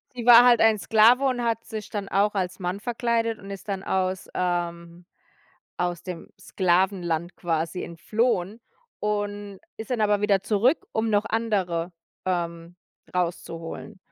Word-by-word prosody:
sie 240 -2 -5
war 240 0 +9
halt 240 -2 +6
ein 225 -1 +5
Sklave 225 +6 +5
und 250 -2 0
hat 230 -1 -1
sich 215 -2 -7
dann 200 -2 -4
auch 205 +2 +1
als 185 0 -2
Mann 180 +2 -3
verkleidet 230 -1 -1
und 195 - -11
ist 195 +1 -8
dann 195 -1 -3
aus 190 0 -1
ähm, 175 -1 -3 0.7
aus 175 -1 -2
dem 180 -3 -7
Sklavenland 175 -2 0
quasi 165 +1 -2
entflohen 210 +4 -1 0.4
und 205 -1 -3 0.2
ist 220 +1 -8
dann 245 -3 0
aber 210 -1 +2
wieder 205 -2 +3
zurück, 230 +9 +2
um 220 0 0
noch 205 0 +2
andere, 190 -7 -1 0.3
ähm, 170 -1 -3 0.4
rauszuholen. 170 -1 -4
195 Hz, 145 wpm, -25 LUFS, 175-220 Hz, 0.7 s, war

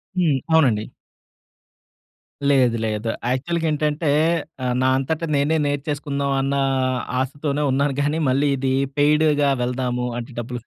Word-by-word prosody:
హ్మ్. 160 -7 +2
అవునండి. 120 -9 +3 1.6
లేదు 125 -4 +3
లేదు. 110 +1 -3 0.2
యాక్చువల్‌గేంటంటే 155 +1 -1 0.5
ఆహ్, 125 -1 0
నా 130 - +3
అంతట 150 +5 -2
నేనే 145 +3 +2
నేర్చేసుకుందాం 145 -1 -2
అన్న 135 +1 -1 0.6
ఆశతోనే 145 +2 -2
ఉన్నాను 140 0 +1
గానీ, 145 +3 0
మళ్ళీ 140 +3 +2
ఇది 130 0 0 0.2
పెయిడ్‌గా 150 -1 +3
వెళ్దాము, 125 0 -2
అంటే 120 +2 -8
డబ్బులు 120 +1 -6
140 Hz, 115 wpm, -22 LUFS, 130-150 Hz, 1.6 s, అవునండి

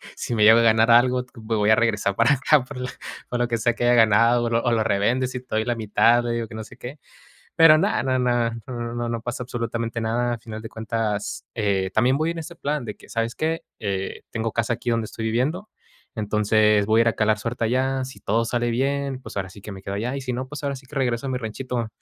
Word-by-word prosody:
"Si - - -4
me 105 -2 +3
llego 110 +2 +8
a - - +4
ganar 110 0 +4
algo, 125 +1 +4
me 110 -1 -3
voy 105 -1 +2
a 110 - +7
regresar 105 -4 +1
para 115 +6 +4
acá, 135 +1 +3
por 125 - -10
lo 125 0 -4 0.4
por 125 - -2
lo 120 - +1
que 115 - 0
sea, 115 +1 +1
que 120 - -4
haya 120 0 +4
ganado, 115 +2 +4
o 115 - 0
lo 115 0 +1
o 120 - +1
lo 115 -2 +2
revendes 120 +6 +1
y 125 - -4
te 125 - -31
doy 110 0 +1
la 120 -1 0
mitad", 115 +2 +3
le 120 - -2
digo 115 -1 -2
que 110 - -11
no 110 - -5
sé - - -14
qué. 135 +4 -9 0.6
Pero, 165 -2 +7
no 190 +6 +1
no 130 -1 0
no 120 -2 +1 0.2
no 120 -2 -5
no 120 0 -2
no 115 -1 -2
pasa 120 +2 -5
absolutamente 115 -1 -3
nada. 120 +2 0
A - - -7
final 110 -1 -8
de 110 - -8
cuentas, 110 -2 -3
eh, 100 -4 0
también 125 +6 +3
voy 155 +3 0
en 170 - -5
ese 165 +1 -8
plan 145 -5 -2
de 105 - -5
que: - - -17
"¿Sabes 115 +1 -2
qué?, 160 +1 -1 0.2
eh, 100 -3 -3
tengo 115 -1 -3
casa 115 0 0
aquí 120 - -4
donde 115 -1 +1
estoy 110 +1 -5
viviendo. 145 - -1 0.5
Entonces, 105 -1 +2
voy 110 +1 +4
a - - +7
ir 115 - +3
a 115 - +2
calar 105 +1 +1
suerte 115 +2 -3
allá. 130 +3 0
Si 130 - -11
todo 115 +3 0
sale 120 0 0
bien, 135 +2 -1
pues, 130 - -11
ahora 95 -1 -3
sí 100 +1 -13
que 105 - -9
me 95 -1 -10
quedo 100 - -5
allá. 120 +6 -2
Y 135 - -5
si 125 -1 -3
no, 130 +2 -4
pues, 150 +1 -8
ahora 140 -1 -2
sí 130 0 -14
que 150 - -13
regreso 125 -1 0
a - - -2
mi 130 - -1
ranchito". 120 0 -4
115 Hz, 265 wpm, -23 LUFS, 110-125 Hz, 0.6 s, llego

